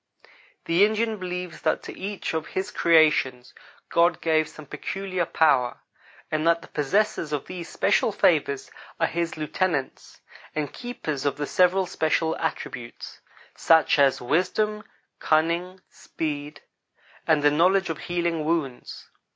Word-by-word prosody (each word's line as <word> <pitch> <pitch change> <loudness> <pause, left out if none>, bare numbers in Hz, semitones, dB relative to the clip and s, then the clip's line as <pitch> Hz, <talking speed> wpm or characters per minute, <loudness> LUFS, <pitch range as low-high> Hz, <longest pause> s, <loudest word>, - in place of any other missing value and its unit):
The 170 +4 +4
Indian 220 +1 +1
believes 180 -2 -5
that - - 0
to - - -8
each 200 -1 -4
of 160 -1 -2
His 190 +2 -3
creations 155 -8 +3 0.4
God 170 0 +3
gave 160 -1 +1
some 155 - -12
peculiar 180 +4 -3
power, 130 -6 +2 0.5
and 155 +1 0
that 170 0 +3
the - - -14
possessors 160 +1 0
of 145 -3 -2
these 180 -2 -7
special - - +2
favors 415 -1 +1 0.3
are - - +3
His 170 -1 -2
lieutenants 155 -2 -2 0.4
and 150 -2 -3
keepers 160 - -5
of 140 -1 -1
the 145 - -2
several 185 +4 +3
special 160 -2 0
attributes; 120 -1 -5 0.4
such 160 -2 +4
as 140 -2 +4
wisdom, 185 - 0 0.4
cunning, 170 +4 +1
speed, 150 -1 -5 0.7
and 155 -2 +3
the 145 - +5
knowledge 180 +4 +3
of 160 - -6
healing 170 -2 -1
wounds. 150 -6 -3
165 Hz, 135 wpm, -25 LUFS, 150-185 Hz, 0.7 s, the